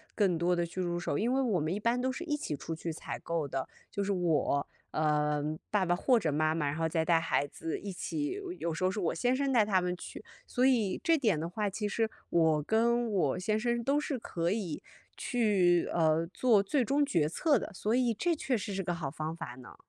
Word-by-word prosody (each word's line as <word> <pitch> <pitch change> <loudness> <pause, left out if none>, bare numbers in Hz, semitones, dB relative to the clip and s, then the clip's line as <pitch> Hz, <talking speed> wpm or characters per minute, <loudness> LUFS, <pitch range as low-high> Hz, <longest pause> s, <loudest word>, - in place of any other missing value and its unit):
更 195 -5 +2
多 175 +2 +1
地 175 - 0
去 180 +2 -5
入 175 -1 -1
手， 160 - -2
因 235 - +1
为 265 - +2
我 210 -8 +1
们 155 - -1
一 195 - -1
般 235 +3 +1
都 260 +1 0
是 300 - -5
一 310 -4 -1
起 160 - -3
出 165 - -5
去 165 +1 -4
采 155 - -6
购 165 -3 -2
的。 135 -1 -3 0.2
就 200 - -2
是 200 - -1
我， 160 -6 +1 0.2
呃， 150 -1 +1 0.3
爸 205 -3 +2
爸 175 0 +2
或 245 +6 +3
者 160 -8 -1
妈 155 +1 +2
妈， 150 - 0
然 145 +1 -1
后 160 0 0
再 160 0 0
带 170 -2 +4
孩 165 -3 +1
子 160 +3 -5
一 200 -2 -6
起， 315 - -3 0.2
有 170 - -2
时 165 - -4
候 185 - +4
是 205 +3 -3
我 170 - 0
先 245 +9 +1
生 275 0 0
带 230 -3 +5
他 200 -3 +2
们 180 0 -1
去。 175 - -9 0.2
所 250 0 +1
以 230 -8 +2
这 330 - +4
点 220 - +2
的 165 - -2
话 205 +4 -2
其 210 +2 -3
实， 225 +2 0 0.2
我 160 -3 +3
跟 235 +4 +2
我 175 -6 +1
先 215 +4 0
生 235 +1 0
都 280 +4 +2
是 290 -2 -2
可 170 -7 -2
以 190 -7 -2 0.3
去， 195 -8 +2
呃， 160 -1 +3
做 225 -6 +4
最 250 +7 +1
终 285 +4 +2
决 160 - +1
策 285 - +2
的， - - -6
所 215 +5 -1
以 245 -1 +3
这 345 - +1
确 265 -4 0
实 205 0 -4
是 195 - -1
个 175 - -2
好 165 -6 -3
方 155 +2 -4
法 165 -7 -7
呢。 125 0 -13
185 Hz, 260 characters per minute, -31 LUFS, 165-235 Hz, 0.3 s, 带